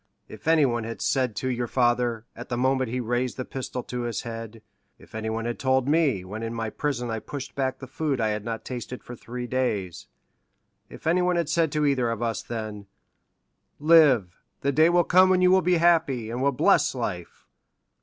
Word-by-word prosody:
If 110 +6 -12
anyone 140 -8 +3
had 115 +1 -6
said 130 -5 0
to 130 - -3
your 120 -1 -1
father, 120 -2 +1
at 120 - -9
the 120 - -2
moment 130 0 +1
he 125 +2 -2
raised 120 +1 -1
the 130 - -4
pistol 130 -1 -5
to 125 -1 -5
his 120 -2 -3
head—if 115 -1 -11
anyone 110 +1 -3
had 120 0 -3
told 130 -1 +1
me, 145 - +2
when 105 +4 -6
in 115 0 -4
my 110 -1 -3
prison 125 -4 -2
I 110 - -2
pushed 140 +5 -7
back 130 -1 -1
the 135 - -9
food 140 0 -2
I 110 -1 +1
had 105 -1 -2
not 115 0 -5
tasted 125 0 -6
for 120 - -9
three 125 +1 -6
days—if 115 - -6
anyone 180 +2 +2
had 170 -3 0
said 160 -1 +1
to 150 -1 +1
either 130 -4 +2
of 115 0 -3
us 115 -1 -1
then, 110 -3 -6 0.9
'Live—the 140 - +3
day 155 +4 +5
will 175 0 +4
come 185 +2 +5
when 185 -1 +3
you 180 - +5
will 190 0 +5
be 180 0 +2
happy, 160 -9 +2
and 120 +2 -3
will 140 +1 +3
bless 150 +1 +3
life! 95 -8 -5
125 Hz, 195 wpm, -25 LUFS, 115-145 Hz, 0.9 s, day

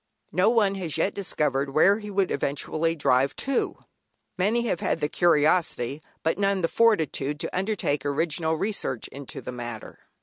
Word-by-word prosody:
No 180 +6 +3
one 220 -4 +3
has 165 -4 -2
yet 200 - +1
discovered 140 -7 -1
where 195 +7 +5
he 210 -1 -8
would 195 -2 0
eventually 155 +4 -1
drive 135 -2 +2
to; 275 -1 -1 0.6
many 215 +6 +1
have 180 -7 -1
had - - -1
the 150 - 0
curiosity 155 -4 +2 0.2
but 160 +4 0
none 195 -1 +1
the - - +4
fortitude 160 - +1
to 165 - -4
undertake 185 -6 -1
original 160 +3 0
research 175 - -2
into 140 -1 -8
the - - -6
matter. 120 -3 -7
165 Hz, 160 wpm, -26 LUFS, 145-195 Hz, 0.6 s, where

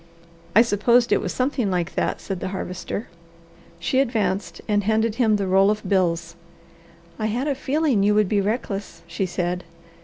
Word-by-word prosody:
"I 225 - +8
supposed 235 +2 +3
it - - +3
was 185 - -3
something 255 -4 0
like 180 -2 -1
that," - - -1
said 195 -3 -4
the - - -3
Harvester. 185 +2 -5 0.7
She 175 +10 0
advanced 200 -9 -1
and 205 -1 +1
handed 220 +1 +1
him 220 -3 +4
the 200 -1 -1
roll 190 +1 +4
of 210 0 -2
bills. 170 -3 0 0.8
"I 215 - 0
had 245 +6 -1
a 285 - +1
feeling 275 -3 +1
you 205 +1 +3
would 210 -2 +3
be 200 +1 +1
reckless," 205 -1 -3
she 175 +3 -2
said. 180 0 -2
205 Hz, 175 wpm, -23 LUFS, 185-230 Hz, 0.8 s, I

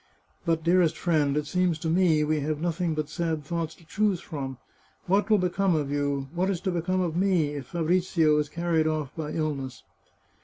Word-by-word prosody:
" - - -38
But, 165 -1 +1
dearest 170 -1 +3
friend, 150 -5 +1
it 150 - 0
seems 180 +1 +1
to 160 - -4
me 165 -2 +3
we 155 0 +1
have 150 +1 -2
nothing 170 0 -1
but 155 -1 -2
sad 160 -1 -2
thoughts 165 0 -3
to 165 - -20
choose 205 +1 +1
from. 135 -7 -6 0.5
What 200 +3 +2
will 215 - +6
become 185 0 +1
of 145 -2 -1
you, 140 -1 -1
what 180 +2 0
is 190 -4 -1
to 190 - -1
become 180 +2 0
of 170 -3 -1
me, 180 -5 +2
if 140 -4 -6
Fabrizio 170 -2 +2
is 150 -1 -1
carried 170 -2 +1
off 155 -4 -2
by 155 -2 -4
ill 155 -1 0
ness 130 -5 -7
160 Hz, 205 wpm, -27 LUFS, 150-180 Hz, 0.5 s, will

